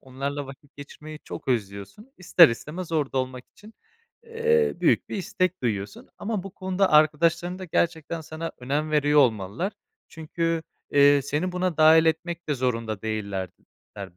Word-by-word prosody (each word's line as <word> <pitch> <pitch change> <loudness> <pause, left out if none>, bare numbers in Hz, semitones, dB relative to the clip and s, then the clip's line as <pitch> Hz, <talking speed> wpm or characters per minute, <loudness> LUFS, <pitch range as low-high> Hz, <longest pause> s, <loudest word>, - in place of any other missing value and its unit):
onlarla 140 +2 -5
vakit 140 +1 -14
geçirmeyi 150 +2 -10
çok 155 - -8
özlüyorsun. 105 - -4
İster 175 -2 +6
istemez 160 +9 -6
orada 145 -4 0
olmak 130 -1 -4
için, 215 +2 -17 0.5
eee, 465 0 +1
büyük - - +2
bir - - -4
istek 185 -3 -2
duyuyorsun 100 -4 -3
ama 210 -3 -3
bu 195 - -8
konuda 190 -1 0
arkadaşların 165 +4 +3
da 185 - -7
gerçekten 165 -1 -1
sana 160 +1 -6
önem 145 +5 -2
veriyor 150 0 +4
olmalılar. 115 - 0 0.4
Çünkü, 165 0 -3 0.3
eee, 145 -1 +5
seni 150 +6 -2
buna 180 -2 -1
dâhil 160 +1 +6
etmek 170 +1 -2
de 150 - +1
zorunda 115 -5 -2
değillerdi 100 -4 -4 0.4
ler 95 -3 -8
155 Hz, 150 wpm, -25 LUFS, 130-175 Hz, 0.5 s, İster